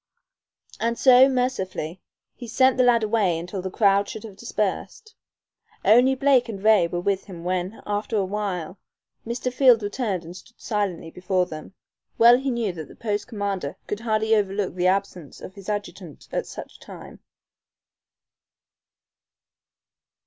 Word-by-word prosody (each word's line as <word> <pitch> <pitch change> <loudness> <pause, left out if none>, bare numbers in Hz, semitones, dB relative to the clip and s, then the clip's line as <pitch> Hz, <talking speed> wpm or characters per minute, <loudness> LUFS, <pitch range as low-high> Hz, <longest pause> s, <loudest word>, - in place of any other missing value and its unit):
And 235 +1 -1
so, 260 +1 +7
mercifully, 190 - -2 0.3
he 240 - -10
sent 260 +3 +3
the 255 - +4
lad 240 -2 +4
away 210 -6 +1
until 180 +3 -5
the 190 - -4
crowd 200 0 +2
should 220 - -7
have 215 -4 -10
dispersed. 215 - -4 0.7
Only 250 +4 +5
Blake 260 -3 +3
and 205 -3 -5
Ray 215 -5 +5
were 175 +1 -3
with 195 +1 -1
him 175 -4 -10
when, 185 +3 -3
after 205 +2 -2
awhile, 190 -3 -3 0.5
Mr. 245 +1 -3
Field 250 -4 +5
returned 205 -4 -3
and 170 +2 -10
stood 235 +6 -15
silently 195 -7 -3
before 180 +1 0
them. 155 +3 -10 0.4
Well 240 +2 +7
he 270 +1 -2
knew 235 -6 -1
that 160 -3 -8
the - - -15
post 210 -2 -3
commander 200 - -4
could 210 - -4
hardly 220 -1 0
overlook 200 -1 -1
the 180 0 0
absence 185 -5 -2
of 185 - -10
his 200 +1 -10
adjutant 195 -6 -6
at - - -2
such - - -10
a - - -34
time. - - -12
205 Hz, 150 wpm, -24 LUFS, 185-235 Hz, 0.7 s, so